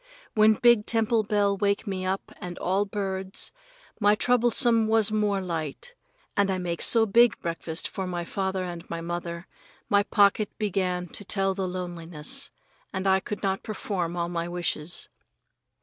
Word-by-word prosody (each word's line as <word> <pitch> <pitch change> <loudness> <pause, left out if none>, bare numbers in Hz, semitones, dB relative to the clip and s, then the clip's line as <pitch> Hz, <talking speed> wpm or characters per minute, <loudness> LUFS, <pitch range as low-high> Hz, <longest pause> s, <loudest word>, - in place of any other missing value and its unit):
When 215 0 +5
big 235 -2 +4
temple 225 0 +2
bell 205 -1 +1
wake 200 0 0
me 185 -2 -3
up 190 +1 -2
and 180 -1 -6
all 195 +3 +1
birds, 195 -2 -2 0.5
my 205 -1 +5
troublesome 240 -1 +3
was 220 -1 +3
more 210 -2 +1
light, 165 - -3 0.4
and 200 -1 +3
I 190 - +1
make 175 -2 -3
so 225 -2 +4
big 235 +3 +4
breakfast 165 -1 -3
for 190 -2 -4
my 175 -1 -3
father 190 0 -2
and 175 -2 -7
my 170 - -3
mother, 170 0 -4 0.4
my 200 0 +5
pocket 205 0 +2
began 185 -4 -1
to 205 - -3
tell 195 -1 0
the 190 -1 -2
loneliness, 175 -4 -5 0.4
and 190 0 -3
I 190 0 +4
could 205 +2 -6
not 195 -1 0
perform 185 -5 -3
all 170 0 0
my 170 -1 -2
wishes. 175 -2 -2
195 Hz, 160 wpm, -27 LUFS, 175-210 Hz, 0.5 s, When